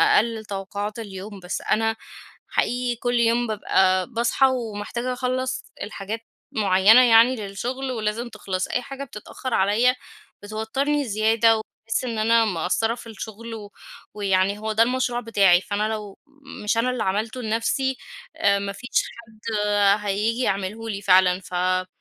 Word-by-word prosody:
أقلّل 225 0 +1
توقعات 205 +2 -5
اليوم 200 -1 -8
بس 180 0 -4
أنا، 225 0 +1 0.5
حقيقي 245 0 0
كلّ 245 +1 -1
يوم 235 +1 +2
بابقى 190 -3 +2
باصحى 235 +2 +2
ومحتاجة 235 0 -3
أخلّص 255 +1 -2 0.2
الحاجات 210 +2 -5 0.3
معيّنة 205 +3 +6
يعني 235 +2 +6
للشغل 245 +5 -4
ولازم 225 +1 -2
تِخلَص، 190 -4 -3
أي 250 - -1
حاجة 275 +2 -7
بتتأخّر 245 +1 -7
عليّا 220 +6 +3 0.5
بتوتّرني 265 +8 -1
زيادة 225 +1 +3
وباحس 225 +2 -4
إن 230 -3 -3
أنا 230 +1 +4
مقصرة 210 +4 0
في 235 - -11
الشغل 225 +1 -8
و 205 -2 -9 0.4
ويعني 200 0 +1
هو 220 +1 -3
ده 220 +1 +5
المشروع 245 0 0
بتاعي، 200 -6 +4
فأنا 205 +2 -1
لو 210 -3 -5 0.5
مش 215 +2 +1
أنا 245 +2 +2
اللي 250 -2 -1
عملته 220 +6 -2
لنفْسي، 230 +4 0 0.4
آآ 200 0 +3
ما 200 0 -3
فيش 245 +5 -10 0.4
حد 220 0 -6 0.5
هييجي 215 +5 0
يعمله 200 +3 -2
لي 200 -1 -4
فعلًا، 185 -1 +4
ف 185 - -13
آآ 185 +1 +1
220 Hz, 145 wpm, -23 LUFS, 200-240 Hz, 0.5 s, معيّنة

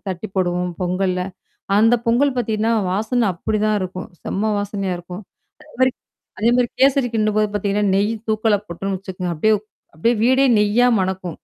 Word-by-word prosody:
தட்டி 185 +3 -5
போடுவோம் 180 -1 0
பொங்கல்ல. 185 0 0 0.6
அந்த 225 +2 +5
பொங்கல் 255 +4 +3
பார்த்தீங்கன்னா 225 -1 0 0.2
வாசனை 225 +4 0
அப்படிதான் 215 +4 0
இருக்கும். 185 0 -5 0.2
செம்ம 215 +3 -1
வாசனையா 200 -2 -3
இருக்கும். 180 +3 -9 0.4
அது 300 0 -19
மாரி 260 0 +5 0.5
அதே 225 +4 +3
மாரி 245 -1 +2
கேசரி 270 -1 +4
கின்டும்போது 215 -1 +1
பார்த்தீங்கன்னா, 205 0 0
நெய் 205 +3 +1 0.2
தூக்கலா 215 -1 +2
போட்டன்னு 190 +3 -3
வச்சுக்கோங்க. 185 -2 -5
அப்டியே 215 +8 +3 0.4
அப்டியியே 230 +9 +2
வீடே 260 +2 +4
நெய்யா 215 +4 +3
மணக்கும். 185 -1 -2
210 Hz, 145 wpm, -20 LUFS, 185-230 Hz, 0.6 s, அந்த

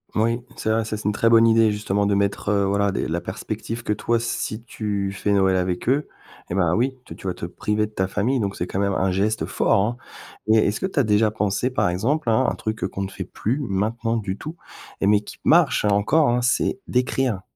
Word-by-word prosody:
Oui, 115 +3 +1
c'est 110 - -1
vrai. 110 0 +1
Ça 110 -1 -3
c'est 110 - -9
une 105 - +3
très 115 +2 +2
bonne 115 0 +6
idée 115 -1 +4
justement 105 -1 0
de 100 - +2
mettre, 100 +1 0
heu, 100 -1 +2
voilà 100 +1 +1
des - - -2
la 85 +2 -2
perspective 115 +1 -5
que 105 - 0
toi 115 +3 0
si 115 -1 -3
tu 100 -4 -3
fais 100 +1 -2
Noël 95 -2 +3
avec 90 +2 -1
eux, 140 +3 +2 0.4
et 85 - -2
bah 85 -3 +2
oui, 130 +3 0
tu - - -10
tu - - -8
vas 90 - -2
te - - -5
priver 105 +4 -1
de 105 - -11
ta 95 -3 -1
famille, 115 +8 0
donc 100 -3 -2
c'est 90 - -2
quand 95 - -4
même 100 0 +1
un 95 0 +1
geste 105 +4 0
fort - - +2
hein 115 +4 -1 0.5
et 110 - +6
est-ce 105 - -1
que 190 - -1
tu 170 - -2
as - - +4
déjà 110 0 +3
pensé, 105 +2 -1
par 125 -8 +1
exemple 120 - -1
hein, 130 +4 +3
un - - -3
truc, 110 0 -4
heu, - - +1
qu'on 100 - -5
ne 95 - -4
fait - - -5
plus 125 +7 -2
maintenant 115 0 -1
du 100 -3 -3
tout, 155 +9 -8 0.4
et - - 0
mais 105 0 +5
qui - - -11
marche - - +4
hein, - - +3
encore 105 +10 +3
hein, 120 +1 +1
c'est 125 +9 +1
d'écrire, 125 -4 0
105 Hz, 250 wpm, -23 LUFS, 100-115 Hz, 0.5 s, bonne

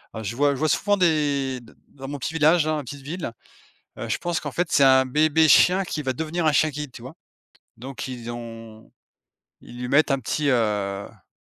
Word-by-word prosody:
heu, 110 - -5
je 105 +3 -4
vois 145 0 +3
je - - -8
vois 155 0 +1
souvent 205 0 +2
des 145 -6 +1
d 115 - -17 0.2
dans 135 -1 -10
mon 145 +1 -5
petit 160 - -4
village, 160 +1 +4
dans 155 0 -1
ma 145 - -4
petite 140 +3 -9
ville, 150 -2 -5 0.7
heu, - - -5
je - - 0
pense 175 0 -2
qu'en - - -5
fait 175 0 0
c'est 140 - +3
un 130 0 +6
bébé 155 +3 +3
chien 185 +5 +5
qui 155 - -4
va 130 -1 -1
devenir 160 +3 -2
un 155 - +4
chien 155 +2 +3
guide, 145 -2 -6
tu 115 - -11
vois? 130 +5 -10 0.6
Donc 130 0 -7
ils 120 -2 -7
ont 115 -2 -10 0.7
ils 120 - -13
lui 125 - -4
mettent 145 +2 +3
un 135 - +1
petit, 145 +4 -1
heu, - - +4
bah, 105 -4 -2
140 Hz, 225 wpm, -23 LUFS, 120-155 Hz, 0.7 s, un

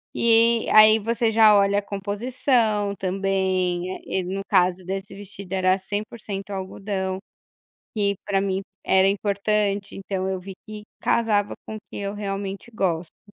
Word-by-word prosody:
E 230 0 +4
aí 215 +1 +8
você 230 +1 0
já 220 -1 +6
olha 200 0 +3
a - - -4
composição 210 +1 0
também, 185 -2 0
eh, - - -3
e 185 - -2
no 190 +2 -3
caso 180 0 +2
desse 195 +1 -5
vestido, 200 -1 -9
era 185 0 +3
100% 205 0 -5
algodão, 190 0 -3 0.8
que 200 -1 +1
para 195 -2 +1
mim 195 -1 -1 0.2
era 190 0 +4
importante, 200 0 0
então 190 -1 -3
eu 190 -1 -2
vi 190 +1 -9
que 215 -1 -8 0.2
casava 210 -3 +1
com 220 - -5
o - - -5
que - - -7
eu 200 0 -4
realmente 200 +2 -5
gosto. 180 -6 -2
200 Hz, 150 wpm, -24 LUFS, 190-210 Hz, 0.8 s, aí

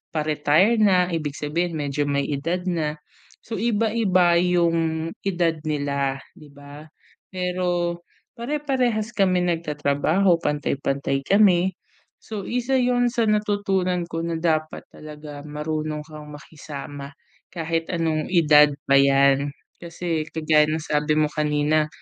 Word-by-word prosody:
pa-retire 155 +8 +2
na, 185 -4 +4
ibig 150 -3 -3
sabihin 165 +3 -2
medyo 145 0 -2
may 140 0 0
edad 170 +6 -2
na. 160 -4 -1 0.5
So 225 - -5
iba-iba 210 -6 +2
yung 165 -2 +1
edad 170 -4 0
nila, 140 -2 -1 0.2
di 150 - -15
ba? 145 +2 -13 0.4
Pero, 180 -2 -2 0.4
pare-parehas 250 -4 -1
kami 185 -5 +2
nag-tatrabaho 165 +2 +1
pantay-pantay 140 -2 -1
kami, 190 0 +4 0.5
so 210 -3 -7
isa 250 +2 -1
yun 245 -1 +2
sa 235 -1 0
natutunan 200 -4 0
ko 165 - -3
na 170 - -2
dapat 155 -2 -1
talaga 150 -1 -10
marunong 155 0 -4
kang 150 -1 -11
makisama, 145 -2 -9 0.4
kahit 165 -1 -2
anong 160 -3 -1
edad 150 -4 +6 0.2
pa 140 - +4
yan. 140 0 +3 0.3
Kasi, 170 -1 -3
kagaya 155 -1 +3
ng 155 +1 -1
sabi 150 0 0
mo 155 - +3
kanina, 150 0 +1
160 Hz, 120 wpm, -23 LUFS, 150-185 Hz, 0.5 s, edad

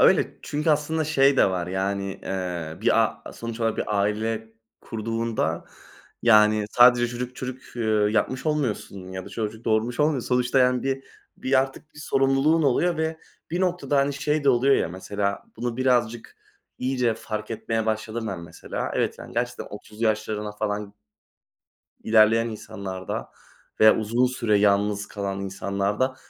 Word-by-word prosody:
öyle, - - +4
çünkü 150 +2 0
aslında 155 +1 +1
şey 140 -2 +4
de 100 - +5
var 90 -2 -2
yani, 95 +1 -2
eee, 90 -4 -4
bir - - +4
a - - -5
sonuç 115 0 -6
olarak 115 -1 +1
bir 105 -1 0
aile 110 +2 -1 0.3
kurduğunda, 115 0 -2 0.6
yani, 105 -2 +5
sadece 120 0 +6
çocuk 125 +1 -5
çocuk, 130 -1 -7
eee, 120 - -2 0.3
yapmış 130 +6 0
olmuyorsun 105 -10 -2
ya 95 0 -5
da - - -9
çocuk 110 0 -5
doğurmuş 115 +4 +1
olmuyorsun. 150 -4 +1
Sonuçta 125 +1 +2
yani, 125 -1 +3
bir 135 0 -2 0.3
bir 130 0 +2
artık 135 +3 -6
bir - - -13
sorumluluğun 135 +3 +2
oluyor 160 +5 +2
ve 160 0 -2 0.3
bir 175 +2 -1
noktada, 180 -6 0
hani, 140 +1 +2
şey 150 +1 -1
de - - +4
oluyor 135 +2 +5
ya, - - +1
mesela, 100 +3 -3
bunu 120 -1 -3
birazcık, 120 -3 0 0.4
iyice 125 -3 +1
fark 110 -1 -5
etmeye 110 0 -2
başladım 110 +1 -2
ben 95 -5 -4
mesela. 85 - -5
Evet, - - 0
yani, - - -10
gerçekten 120 +1 -2
30'lu 105 +2 -6
yaşlarına 110 -1 -1
falan 105 -1 -3 1.1
ilerleyen 110 +1 +4
insanlarda 100 -4 -6 0.5
veya 110 0 +7
uzun 115 +4 +2
süre 115 -4 +1
yalnız 105 0 +2
kalan 100 -2 -4
insanlarda 100 +6 -1
115 Hz, 150 wpm, -25 LUFS, 105-130 Hz, 1.1 s, veya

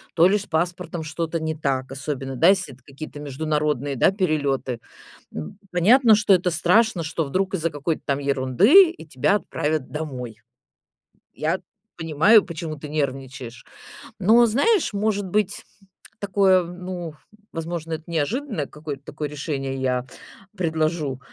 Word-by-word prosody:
то 170 +1 +6
ли 205 +2 +3
с 205 - -6
паспортом 170 0 -2
что-то 165 +1 -3
не 160 0 -2
так, 135 -3 -2
особенно, 135 -1 -4
да, 165 +8 +5
если 190 -7 +1
это 125 - -20
какие-то 145 +2 -9
международные, 150 -1 -1
да, 130 - +4
перелеты. 145 - -1 0.5
Н 80 - -7
понятно, 220 +6 +5
что 210 -1 +3
это 180 -1 +2
страшно, 180 +3 +3
что 160 +1 -2
вдруг 190 +7 -1
из-за 165 -3 0
какой-то 150 +2 -3
там 140 -1 0
ерунды 140 - +5
и 345 - -12
тебя 150 +7 +1
отправят 155 -7 -2
домой. 125 -7 -6 0.9
Я - - -1 0.4
понимаю, 165 +7 +5
почему 160 -2 -6
ты 150 - -8
нервничаешь, 130 -4 -4 0.5
но, 230 +5 +5
знаешь, 295 - +2
может 205 -1 0
быть, 205 +1 -1 0.6
такое, 190 -2 +3
ну, 175 -1 -6 0.4
возможно, 165 0 -4
это 155 - -5
неожиданное 170 - -2
какое-то 150 -2 -8
такое 150 0 -5
решение 135 -2 -4
я 130 -1 -1 0.5
предложу. 160 -5 -1
160 Hz, 140 wpm, -23 LUFS, 140-185 Hz, 0.9 s, то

